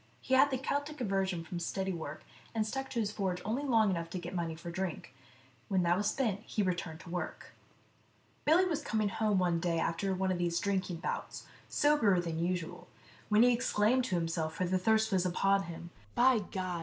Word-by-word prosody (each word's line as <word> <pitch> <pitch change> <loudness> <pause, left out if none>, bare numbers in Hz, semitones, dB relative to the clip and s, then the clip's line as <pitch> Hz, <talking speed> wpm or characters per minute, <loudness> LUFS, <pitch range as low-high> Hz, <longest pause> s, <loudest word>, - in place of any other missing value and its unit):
He 260 - -3
had 265 +2 +6
the 265 - 0
Keltic 285 +3 -3
aversion 195 -6 0
from 170 +1 -5
steady 190 +2 -2
work, 155 -3 -6 0.3
and 220 -1 +1
stuck 270 +5 -3
to 235 - -2
his 210 -2 0
forge 190 -4 -2
only 230 +6 -1
long 225 -7 +3
enough 170 -2 -2
to 185 - -4
get 175 +1 -6
money 170 -3 -2
for 170 +1 -7
drink; 175 -7 -4 0.5
when 190 -2 +2
that 175 0 +3
was 205 +2 +1
spent, 220 -8 0
he 215 -1 -2
returned 175 -3 -2
to 185 - -12
work. 175 0 -5 0.9
Billy 330 +5 +5
was 335 -5 -1
coming 215 -1 0
home 210 0 +1
one 175 -2 +2
day 170 0 0
after 180 +4 0
one 190 0 0
of 180 - -1
these 170 -1 +1
drinking 190 -4 -1
bouts, - - -4 0.2
soberer 290 -11 +3
than 165 -1 -2
usual, 175 -2 -3 0.4
when 210 +2 +6
he 245 0 +6
exclaimed 240 +1 +2
to 190 - -1
himself, 165 -2 -1
for 185 - 0
the 185 +1 +1
thirst 220 +3 +2
was 185 -2 +2
upon 195 +2 +2
him, 170 0 -8
" 100 - -29
By 250 -1 +5
God 185 -3 -4
190 Hz, 205 wpm, -32 LUFS, 175-220 Hz, 0.9 s, had